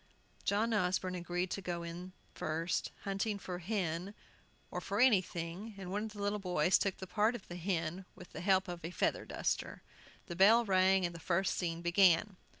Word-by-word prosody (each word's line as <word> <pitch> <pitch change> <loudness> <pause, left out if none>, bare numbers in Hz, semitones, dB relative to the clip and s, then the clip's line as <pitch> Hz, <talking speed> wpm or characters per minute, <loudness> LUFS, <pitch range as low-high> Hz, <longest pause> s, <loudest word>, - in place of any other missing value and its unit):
John 220 +3 +1
Osborne 185 -2 +1
agreed 175 0 -2
to 195 - -3
go 175 -2 -3
in 170 +2 -6
the - - -13 0.3
first, 165 +3 -1
hunting 200 +1 -1
the 180 -1 -4
"hin," 185 0 -2 0.6
or - - -3 0.2
anything, 190 -3 +1
and 185 -2 -7
one 205 +2 -1
of 215 - -7
the 205 - -7
little 205 +1 0
boys 180 -2 +3
took 195 -2 0
the 190 - -6
part 215 +5 +1
of 225 - -9
the 175 - -7
hen, 175 0 -2
with 180 - -13
the - - -7
help 190 +1 +3
of 175 -2 -6
a 165 - -3
feather 180 - 0
duster. - - -2 0.4
The 175 - -6
bell 220 +6 +6
rang, 190 -1 +4
and 170 - -3
the 170 - -8
first 190 +3 0
scene 170 -1 -2
began. 180 +2 +4
185 Hz, 190 wpm, -34 LUFS, 175-200 Hz, 0.6 s, bell